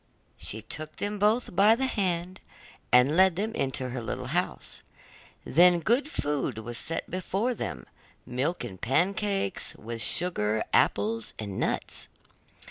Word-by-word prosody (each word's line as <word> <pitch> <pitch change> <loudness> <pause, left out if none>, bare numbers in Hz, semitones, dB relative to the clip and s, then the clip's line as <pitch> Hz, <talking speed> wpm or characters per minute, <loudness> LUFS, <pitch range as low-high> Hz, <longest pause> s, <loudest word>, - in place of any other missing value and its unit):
She 110 +1 -4
took 155 +7 -6
them 205 0 -3
both 215 0 +2
by 210 +3 +6
the 265 +3 0
hand, 185 -6 -1 0.5
and 125 +5 +5
led 190 -1 +5
them 215 +4 -2
into 130 - -1
her 125 0 -4
little 115 - -4
house. - - -2 0.6
Then 175 +1 +6
good 240 - +1
food 145 - -1
was 120 +2 -4
set 165 +1 -2
before 195 +7 -1
them, 65 - -5 0.4
milk 135 +7 -2
and 95 -6 -8
pancakes, 195 - 0
with 115 +1 -6
sugar, 110 -8 +1
apples, 110 +2 +2
and 100 -3 -5
nuts. - - -1
165 Hz, 135 wpm, -28 LUFS, 120-195 Hz, 0.6 s, by